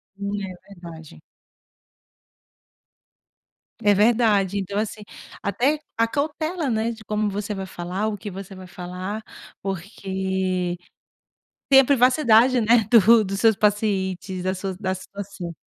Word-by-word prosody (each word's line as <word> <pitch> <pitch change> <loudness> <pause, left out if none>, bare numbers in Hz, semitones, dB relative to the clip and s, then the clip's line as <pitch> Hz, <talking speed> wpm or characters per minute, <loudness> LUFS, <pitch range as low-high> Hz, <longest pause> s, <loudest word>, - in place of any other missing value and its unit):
Hum, 200 +1 -4
é 185 -1 -6 0.2
verdade. 160 - -11 2.6
É 205 0 +5
verdade. 210 -2 +3
Então, 200 +1 -2
assim, 215 0 -4 0.4
até 245 +10 +1 0.2
a 230 0 +3
cautela, 310 +3 -2
né, 225 +1 0
de 220 -1 -10
como 210 0 -1
você 205 +1 -4
vai 195 -1 -5
falar, 185 +5 -3
o 210 -1 -3
que 205 +1 -7
você 195 +1 -9
vai 185 0 -10
falar, 180 +4 -6 0.4
porque 190 -1 -2 0.9
tem 270 -1 +8
a - - +3
privacidade, 250 -2 +4
né? 225 -1 +4
Do 225 -1 +6
dos 195 +1 -3
seus 225 -3 +4
pacientes 195 -3 0
da 185 +1 -1
sua 190 -1 -5
da 190 -2 -1
situação. 190 -2 -8
200 Hz, 130 wpm, -23 LUFS, 190-225 Hz, 2.6 s, tem